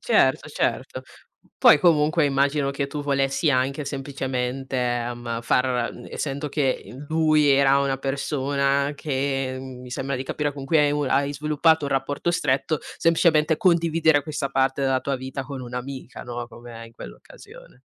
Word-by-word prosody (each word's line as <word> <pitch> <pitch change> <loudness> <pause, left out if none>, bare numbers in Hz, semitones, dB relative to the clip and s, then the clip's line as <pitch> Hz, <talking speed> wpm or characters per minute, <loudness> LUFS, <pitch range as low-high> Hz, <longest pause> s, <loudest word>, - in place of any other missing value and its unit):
Certo, - - +2
certo. - - -2 0.6
Poi - - +7
comunque 155 -1 +3
immagino 140 0 +1
che 140 0 -2
tu 145 +1 -5
volessi 140 +2 +1
anche 135 +2 0
semplicemente, 135 -2 -3
ehm, 120 -1 -2
far 125 0 +1
n - - -11
essendo 140 +1 -4
che, 135 -2 0
uhm, 140 +4 -10
lui 155 -2 +3
era 140 0 +5
una 135 -1 0
persona 140 0 0
che, 135 -2 -2
mi 125 -1 -10
sembra 135 +2 -3
di 130 - -3
capire 145 +2 -2
con 140 -1 -8
cui 160 +3 +2
hai 145 -1 +3
un 145 -2 -1
hai 140 +2 +1
sviluppato 150 +1 +2
un 140 - -3
rapporto 140 +5 -1
stretto, 150 -1 0 0.2
semplicemente 165 -2 +3
condividere 165 -6 +3
questa 145 -1 -4
parte 135 0 +1
della 135 -1 +1
tua 140 0 -2
vita 130 +1 -5
con 135 -1 -7
un'amica, 125 +2 -7
no, 120 -1 -6
come 115 -1 -11
in 115 - -17
quell'occasione. 115 - -13
140 Hz, 155 wpm, -24 LUFS, 130-150 Hz, 0.6 s, Poi